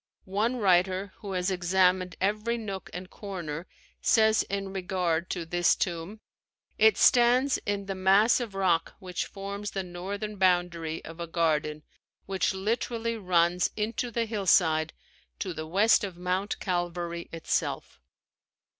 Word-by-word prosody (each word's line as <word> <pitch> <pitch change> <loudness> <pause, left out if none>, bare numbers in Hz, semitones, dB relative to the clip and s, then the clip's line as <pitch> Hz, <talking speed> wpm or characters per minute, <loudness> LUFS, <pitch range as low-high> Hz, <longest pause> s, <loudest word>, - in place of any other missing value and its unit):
One 210 +6 0
writer 190 -1 +2
who 200 -2 -7
has 180 +1 0
examined 185 0 +2
every 215 +4 0
nook 200 -4 -6
and 180 +1 -7
corner 175 -5 -6 0.3
says 220 -1 +4
in 195 -1 -3
regard 180 -3 -1
to 175 -3 -3
this 175 +1 +2
tomb: 175 +4 -3 0.6
"It 440 0 +6
stands 250 +2 +4
in 200 -1 -1
the 195 - -3
mass 195 +6 +4
of 230 -5 -5
rock 180 -4 +1
which 180 -3 -4
forms 200 +1 -6
the 195 - -3
northern 200 +4 -5
boundary 175 -3 +1
of 165 +1 -10
a 170 - -4
garden 155 -2 0 0.4
which 190 -1 0
literally 230 +3 -2
runs 180 -3 +2
into 225 +3 -2
the 235 0 -1
hillside 175 -7 +2 0.5
to 185 -3 -3
the 155 0 -6
west 205 +8 +4
of 190 -4 -5
Mount 185 +3 -1
Calvary 175 -2 -3
itself." 165 - -3
190 Hz, 135 wpm, -28 LUFS, 175-205 Hz, 0.6 s, It